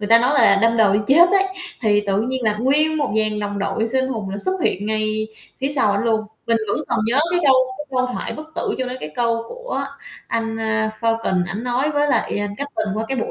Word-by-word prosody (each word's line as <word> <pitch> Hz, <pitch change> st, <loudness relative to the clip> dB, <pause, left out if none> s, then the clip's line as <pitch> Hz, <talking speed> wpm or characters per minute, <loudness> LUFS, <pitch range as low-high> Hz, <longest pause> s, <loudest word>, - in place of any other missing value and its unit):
người 205 Hz, -, -3 dB
ta 230 Hz, +1 st, +8 dB
nói 255 Hz, +5 st, +2 dB
là 200 Hz, -7 st, +5 dB
đâm 230 Hz, 0 st, +3 dB
đầu 210 Hz, -3 st, +4 dB
đi 205 Hz, -, +2 dB
chết 335 Hz, +6 st, +6 dB
ấy, 390 Hz, 0 st, +4 dB, 0.4 s
thì 205 Hz, -2 st, +3 dB
tự 195 Hz, +1 st, +1 dB
nhiên 255 Hz, +2 st, -2 dB
là 210 Hz, -1 st, +1 dB
nguyên 295 Hz, +6 st, +2 dB
một 290 Hz, -8 st, -1 dB
dàn 215 Hz, -1 st, 0 dB
đồng 205 Hz, 0 st, -3 dB
đội 200 Hz, +3 st, -1 dB
siêu 260 Hz, +3 st, 0 dB
anh 260 Hz, -, -2 dB
hùng 220 Hz, -7 st, -4 dB
là 200 Hz, -, -4 dB
xuất 375 Hz, -, -2 dB
hiện 205 Hz, +3 st, 0 dB
ngay 215 Hz, 0 st, -1 dB, 0.3 s
phía 270 Hz, -, 0 dB
sau 260 Hz, -8 st, +3 dB
ảnh 200 Hz, -, -1 dB
luôn. 220 Hz, -1 st, +1 dB, 0.2 s
Mình 230 Hz, 0 st, +3 dB
vẫn -, -, 0 dB
còn -, -, 0 dB
nhớ 250 Hz, +6 st, +3 dB
cái 350 Hz, 0 st, +2 dB
câu 265 Hz, -, +6 dB, 0.2 s
cái 295 Hz, -, -5 dB
câu 255 Hz, -1 st, +1 dB
thoại -, -, -4 dB
bất 310 Hz, +1 st, -8 dB
tử -, -, -2 dB
chỗ 260 Hz, -, -1 dB
đó, 250 Hz, -, -4 dB
cái 150 Hz, -, -5 dB
câu 230 Hz, -1 st, 0 dB
của -, -, -5 dB, 0.5 s
anh, 225 Hz, -1 st, -2 dB
a, 220 Hz, -1 st, 0 dB
Falcon, 225 Hz, -5 st, +1 dB
ảnh 195 Hz, +6 st, -5 dB
nói 255 Hz, +4 st, 0 dB
với 290 Hz, 0 st, +1 dB
lại -, -, +1 dB, 0.2 s
Captain 280 Hz, -6 st, -3 dB
qua 220 Hz, +1 st, -2 dB
cái 265 Hz, -2 st, -2 dB
bộ -, -, -2 dB
230 Hz, 255 wpm, -20 LUFS, 215-270 Hz, 0.5 s, ta